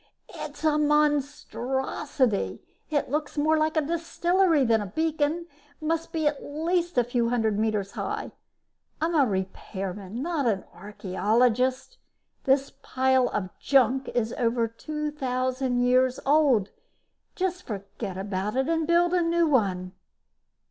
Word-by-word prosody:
"It's -, -, -8 dB
a 305 Hz, -1 st, +3 dB
monstrosity! 280 Hz, -4 st, 0 dB, 0.3 s
It 290 Hz, -4 st, -1 dB
looks 300 Hz, 0 st, -2 dB
more 310 Hz, +2 st, +3 dB
like 310 Hz, +1 st, +1 dB
a -, -, +5 dB
distillery 340 Hz, 0 st, +2 dB
than 225 Hz, -2 st, +3 dB
a 205 Hz, -, -4 dB
beacon 315 Hz, -, -1 dB, 0.3 s
must 325 Hz, +1 st, -2 dB
be 320 Hz, -2 st, -1 dB
at 295 Hz, -1 st, 0 dB
least 340 Hz, +2 st, -1 dB
a 245 Hz, -, +5 dB
few 240 Hz, -1 st, 0 dB
hundred 220 Hz, -4 st, +1 dB
meters 210 Hz, -3 st, 0 dB
high. -, -, -4 dB, 0.7 s
I'm 325 Hz, +2 st, 0 dB
a 285 Hz, -5 st, +4 dB
repairman, 190 Hz, +1 st, -4 dB
not 320 Hz, -6 st, 0 dB
an 200 Hz, -4 st, 0 dB
archeologist. 220 Hz, -, 0 dB, 0.5 s
This 270 Hz, +1 st, +2 dB
pile 260 Hz, -1 st, +2 dB
of 185 Hz, -3 st, -4 dB
junk 265 Hz, -1 st, +3 dB
is 230 Hz, -1 st, 0 dB
over 230 Hz, -1 st, +1 dB
2000 260 Hz, -2 st, -2 dB
years 255 Hz, +1 st, +3 dB
old. 275 Hz, -8 st, +3 dB, 0.6 s
Just 365 Hz, -1 st, -1 dB
forget 200 Hz, -, -6 dB
about 195 Hz, +2 st, -3 dB
it 265 Hz, +1 st, +1 dB
and 325 Hz, -1 st, 0 dB
build 345 Hz, +1 st, +3 dB
a 360 Hz, -, +3 dB
new 340 Hz, 0 st, +2 dB
one." 195 Hz, -, +1 dB
265 Hz, 130 wpm, -26 LUFS, 225-310 Hz, 0.7 s, a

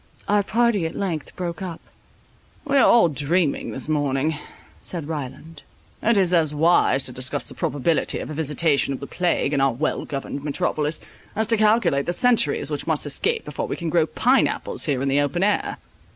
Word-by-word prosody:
Our 205 Hz, 0 st, +3 dB
party 220 Hz, -4 st, +1 dB
at -, -, -9 dB
length 170 Hz, -6 st, -4 dB
broke 175 Hz, 0 st, -5 dB
up; 175 Hz, -4 st, -6 dB, 0.9 s
"We 280 Hz, -1 st, -1 dB
are 270 Hz, -, +6 dB
all 235 Hz, -6 st, +6 dB
dreaming 150 Hz, +2 st, 0 dB
this 130 Hz, -, -3 dB
morning," 145 Hz, 0 st, 0 dB, 0.5 s
said 165 Hz, -5 st, -3 dB
Ryland, 155 Hz, +1 st, -7 dB, 0.4 s
"it 230 Hz, -1 st, +2 dB
is 185 Hz, -2 st, +2 dB
as 155 Hz, -3 st, +3 dB
wise 155 Hz, -3 st, +3 dB
to 130 Hz, -, +3 dB
discuss 130 Hz, +3 st, -1 dB
the -, -, -5 dB
probability 150 Hz, +3 st, 0 dB
of -, -, -6 dB
a -, -, -4 dB
visitation 150 Hz, -2 st, +1 dB
of -, -, -9 dB
the 140 Hz, -, -7 dB
plague 175 Hz, -3 st, -1 dB
in 140 Hz, -, +1 dB
our 135 Hz, -2 st, +2 dB
well 150 Hz, +6 st, -2 dB
governed 140 Hz, 0 st, -5 dB
metropolis, 150 Hz, 0 st, -2 dB, 0.3 s
as 220 Hz, +1 st, +1 dB
to 230 Hz, -, +6 dB
calculate 215 Hz, -10 st, +2 dB
the 175 Hz, -, +1 dB
centuries 245 Hz, +3 st, +2 dB
which -, -, -4 dB
must -, -, +1 dB
escape 460 Hz, 0 st, 0 dB
before -, -, -4 dB
we -, -, -3 dB
can 170 Hz, -2 st, -4 dB
grow 165 Hz, -1 st, +2 dB
pine -, -, +2 dB
apples -, -, -2 dB
here 135 Hz, -2 st, -1 dB
in -, -, -1 dB
the 135 Hz, +1 st, +2 dB
open 145 Hz, +6 st, -1 dB
air." 210 Hz, 0 st, 0 dB
160 Hz, 195 wpm, -22 LUFS, 145-185 Hz, 0.9 s, are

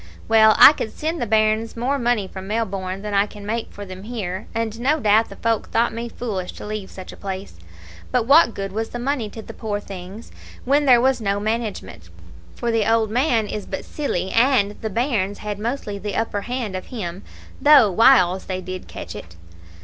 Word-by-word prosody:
"Well, 220 Hz, -1 st, +6 dB
I 290 Hz, -, +10 dB
could 220 Hz, -, -4 dB
send 320 Hz, 0 st, -3 dB
the 240 Hz, -, -1 dB
bairns 220 Hz, +1 st, +1 dB
more 265 Hz, +4 st, 0 dB
money 235 Hz, -5 st, +1 dB
from 190 Hz, 0 st, -9 dB
Melbourne 195 Hz, -3 st, -3 dB
than 210 Hz, -1 st, -4 dB
I 200 Hz, +1 st, +3 dB
can 205 Hz, -1 st, -11 dB
make 225 Hz, +2 st, -3 dB
for 205 Hz, -, -8 dB
them 185 Hz, -1 st, -9 dB
here, 205 Hz, -4 st, -5 dB
and 225 Hz, -1 st, -3 dB
no 285 Hz, +6 st, +1 dB
doubt 220 Hz, -1 st, +3 dB
the -, -, -10 dB
folk 225 Hz, -2 st, -1 dB
thought 230 Hz, 0 st, +1 dB
me 235 Hz, +1 st, -5 dB
foolish 200 Hz, -7 st, -4 dB
to -, -, -9 dB
leave 210 Hz, -2 st, -5 dB
such 185 Hz, -1 st, -10 dB
a -, -, -11 dB
place; 190 Hz, -, -7 dB, 0.5 s
but 250 Hz, -2 st, +2 dB
what 280 Hz, -2 st, +5 dB
good 195 Hz, -1 st, -4 dB
was 220 Hz, +3 st, -3 dB
the -, -, -6 dB
money 245 Hz, -3 st, -2 dB
to 220 Hz, +1 st, -9 dB
the -, -, -10 dB
poor 210 Hz, -2 st, -3 dB
things 195 Hz, +2 st, -10 dB, 0.3 s
when 285 Hz, +3 st, +3 dB
there 245 Hz, -2 st, +7 dB
was 260 Hz, 0 st, +2 dB
no 200 Hz, -1 st, 0 dB
management, 210 Hz, -, -4 dB, 0.5 s
for 235 Hz, -, -2 dB
the 225 Hz, -1 st, +1 dB
old 225 Hz, -2 st, +2 dB
man 240 Hz, -2 st, +2 dB
is 210 Hz, -1 st, -6 dB
but 190 Hz, -, -5 dB
silly, 190 Hz, -, -3 dB
and 230 Hz, -4 st, +3 dB
the 220 Hz, -, -2 dB
bairns 210 Hz, -3 st, -1 dB
had 210 Hz, -1 st, -5 dB
mostly 215 Hz, -3 st, -3 dB
the 205 Hz, +1 st, -4 dB
upper 225 Hz, -2 st, -1 dB
hand 240 Hz, -3 st, -4 dB
of 185 Hz, -, -6 dB
him, 190 Hz, -6 st, -6 dB, 0.4 s
though 285 Hz, -8 st, +7 dB
whiles 190 Hz, -4 st, +4 dB
they 185 Hz, -1 st, -3 dB
did 185 Hz, 0 st, -7 dB
catch -, -, -8 dB
it. 85 Hz, 0 st, -10 dB
215 Hz, 205 wpm, -22 LUFS, 195-235 Hz, 0.5 s, I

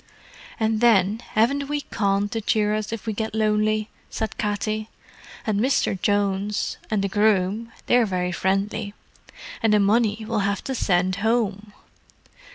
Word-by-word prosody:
"And 220 Hz, 0 st, +1 dB
then, 215 Hz, -2 st, +4 dB
haven't 275 Hz, +6 st, +2 dB
we 295 Hz, 0 st, -1 dB
Con 200 Hz, -5 st, 0 dB
to 225 Hz, +2 st, -3 dB
cheer 210 Hz, 0 st, +1 dB
us 215 Hz, 0 st, -2 dB
up 225 Hz, -, -5 dB
if 225 Hz, -, -6 dB
we 220 Hz, -, -1 dB
get 220 Hz, +1 st, -3 dB
lonely?" 215 Hz, 0 st, +1 dB, 0.2 s
said 220 Hz, -, -4 dB
Katty. 215 Hz, +1 st, -2 dB, 0.6 s
"And 210 Hz, -3 st, 0 dB
Misther 260 Hz, -3 st, +2 dB
Jones 200 Hz, +1 st, 0 dB
and 210 Hz, -3 st, 0 dB
the -, -, +1 dB
groom—they're 215 Hz, +4 st, +1 dB
very 180 Hz, -2 st, -1 dB
friendly. 195 Hz, +3 st, -1 dB, 0.7 s
And 225 Hz, -1 st, +3 dB
the 210 Hz, -, +5 dB
money 215 Hz, +1 st, +2 dB
we'll 225 Hz, -2 st, 0 dB
have 200 Hz, 0 st, -1 dB
to 270 Hz, -, -3 dB
send 185 Hz, -5 st, +1 dB
home! 210 Hz, -1 st, -1 dB
215 Hz, 150 wpm, -23 LUFS, 200-220 Hz, 0.7 s, the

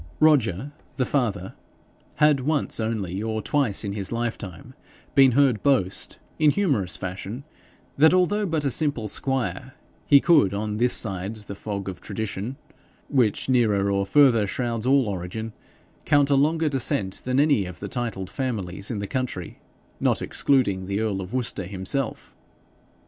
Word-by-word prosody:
Roger, 140 Hz, -, +3 dB, 0.3 s
the 130 Hz, -, +1 dB
father, 105 Hz, -10 st, -1 dB, 0.6 s
had 150 Hz, -2 st, +4 dB
once 145 Hz, 0 st, 0 dB
only 105 Hz, -4 st, -2 dB
or 110 Hz, 0 st, -2 dB
twice 115 Hz, -2 st, 0 dB
in 100 Hz, -1 st, -3 dB
his 100 Hz, -2 st, -3 dB
lifetime 115 Hz, -2 st, -5 dB, 0.4 s
been 135 Hz, -2 st, +6 dB
heard 135 Hz, -4 st, +3 dB
boast, 100 Hz, -10 st, 0 dB, 0.2 s
in 155 Hz, -1 st, +5 dB
humorous 135 Hz, -, 0 dB
fashion, 95 Hz, +7 st, -6 dB, 0.6 s
that 160 Hz, +2 st, +7 dB
although 195 Hz, +3 st, +2 dB
but 160 Hz, -3 st, -1 dB
a 140 Hz, -, +1 dB
simple 140 Hz, -6 st, 0 dB
squire, 130 Hz, +1 st, -2 dB, 0.3 s
he 140 Hz, -, +7 dB
could, 140 Hz, -, +4 dB
on 105 Hz, 0 st, -3 dB
this 120 Hz, +2 st, +2 dB
side 100 Hz, 0 st, -2 dB
the 105 Hz, -2 st, -9 dB
fog 100 Hz, -1 st, -5 dB
of 95 Hz, -2 st, -6 dB
tradition, 110 Hz, +4 st, -5 dB, 0.5 s
which 125 Hz, -7 st, +1 dB
nearer 105 Hz, -6 st, +2 dB
or 100 Hz, 0 st, +1 dB
further 115 Hz, -2 st, +4 dB
shrouds 120 Hz, +1 st, -2 dB
all 135 Hz, -3 st, +4 dB
origin, 100 Hz, +4 st, -5 dB, 0.5 s
count 145 Hz, -1 st, +3 dB
a -, -, +5 dB
longer 155 Hz, +3 st, +2 dB
descent 110 Hz, -8 st, -1 dB
than 130 Hz, +1 st, 0 dB
any 140 Hz, -10 st, +3 dB
of 90 Hz, -1 st, -9 dB
the -, -, -5 dB
titled 115 Hz, -7 st, -4 dB
families 100 Hz, -7 st, -4 dB
in 115 Hz, -, -3 dB
the 100 Hz, -, -3 dB
county, 120 Hz, -7 st, -4 dB, 0.4 s
not -, -, +1 dB
excluding 100 Hz, -10 st, +1 dB
the 100 Hz, +1 st, -1 dB
earl 105 Hz, -3 st, -1 dB
of 95 Hz, +1 st, -8 dB
Worcester 125 Hz, -6 st, -2 dB
himself. 95 Hz, +8 st, -3 dB
115 Hz, 155 wpm, -24 LUFS, 100-140 Hz, 0.6 s, that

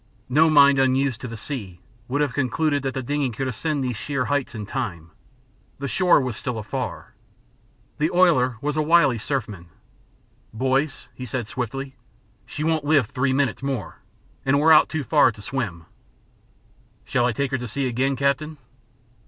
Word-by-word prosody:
No 155 Hz, +5 st, +4 dB
mind 140 Hz, -2 st, +6 dB
unused 130 Hz, -2 st, +1 dB
to -, -, -5 dB
the 115 Hz, -1 st, -7 dB
sea 100 Hz, -, -6 dB, 0.3 s
would 145 Hz, +3 st, -1 dB
have 145 Hz, -3 st, 0 dB
concluded 145 Hz, +2 st, 0 dB
that 135 Hz, -1 st, -3 dB
the 130 Hz, -, -3 dB
dingey 145 Hz, +1 st, -1 dB
could 130 Hz, +3 st, -4 dB
ascend 140 Hz, +4 st, -2 dB
these 125 Hz, -2 st, -2 dB
sheer 130 Hz, +3 st, -2 dB
heights 145 Hz, -3 st, -1 dB
in 105 Hz, -2 st, -5 dB
time. 85 Hz, -5 st, -5 dB, 0.7 s
The 140 Hz, -, -4 dB
shore 180 Hz, +4 st, +4 dB
was 130 Hz, -4 st, -3 dB
still 120 Hz, +1 st, -4 dB
afar. 105 Hz, -1 st, -5 dB, 0.9 s
The 155 Hz, +2 st, +2 dB
oiler 155 Hz, -10 st, +3 dB
was 150 Hz, +1 st, -1 dB
a 155 Hz, -, +1 dB
wily 150 Hz, -6 st, +4 dB
surfman. 105 Hz, -, -4 dB, 0.9 s
"Boys," 135 Hz, +4 st, 0 dB
he 125 Hz, -, -8 dB
said 120 Hz, 0 st, -3 dB
swiftly, 130 Hz, +4 st, -5 dB, 0.5 s
"she 150 Hz, -, -5 dB
won't 160 Hz, -1 st, +1 dB
live 145 Hz, -4 st, +3 dB
three 130 Hz, 0 st, 0 dB
minutes 135 Hz, -3 st, 0 dB
more, 135 Hz, -9 st, -4 dB, 0.4 s
and 135 Hz, +1 st, +2 dB
we're 160 Hz, +2 st, +5 dB
too 155 Hz, -2 st, -4 dB
far -, -, +4 dB
out 115 Hz, -, -1 dB
to 105 Hz, -, -12 dB
swim. 100 Hz, -12 st, -4 dB, 1.2 s
Shall 120 Hz, -, +1 dB
I -, -, +1 dB
take 135 Hz, +4 st, -2 dB
her 135 Hz, -, -1 dB
to 125 Hz, -, -5 dB
sea 135 Hz, +5 st, -2 dB
again, 130 Hz, +2 st, 0 dB
captain?" 140 Hz, +3 st, -1 dB
135 Hz, 170 wpm, -23 LUFS, 120-145 Hz, 1.2 s, mind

